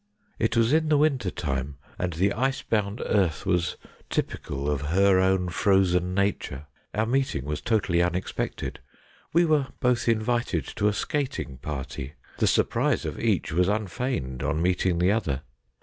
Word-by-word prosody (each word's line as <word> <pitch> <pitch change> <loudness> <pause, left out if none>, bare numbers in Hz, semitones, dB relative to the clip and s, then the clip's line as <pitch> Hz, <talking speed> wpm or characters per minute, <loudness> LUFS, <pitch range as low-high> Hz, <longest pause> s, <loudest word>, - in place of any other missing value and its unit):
It - - +1
was 115 +4 +3
in 155 0 +3
the 150 - +4
winter 140 -9 +2
time, 70 -5 -3 0.2
and 90 -1 -1
the 95 +5 +1
ice 135 +4 0
bound 105 0 -1
earth 95 -4 +1
was 90 -2 0 0.3
typical 70 +1 -3
of 75 -2 0
her 95 +5 +4
own 95 -1 +2
frozen 90 -1 +2
nature. 100 -8 -1 0.3
Our 110 +1 +2
meeting 130 - 0
was 75 0 -3
totally 100 -6 +1
unexpected. 90 +1 -2 0.5
We 170 +2 +4
were 150 -4 +2
both 125 -2 +2
invited 110 - 0
to 105 - +2
a 105 - +2
skating 130 - -3
party. 70 -1 -5 0.3
The - - +3
surprise - - +2
of - - -4
each - - 0
was 90 +2 +3
unfeigned 100 - -2
on 80 - 0
meeting 90 0 +1
the 90 +3 +3
other. 75 -11 -1
95 Hz, 155 wpm, -26 LUFS, 80-115 Hz, 0.5 s, the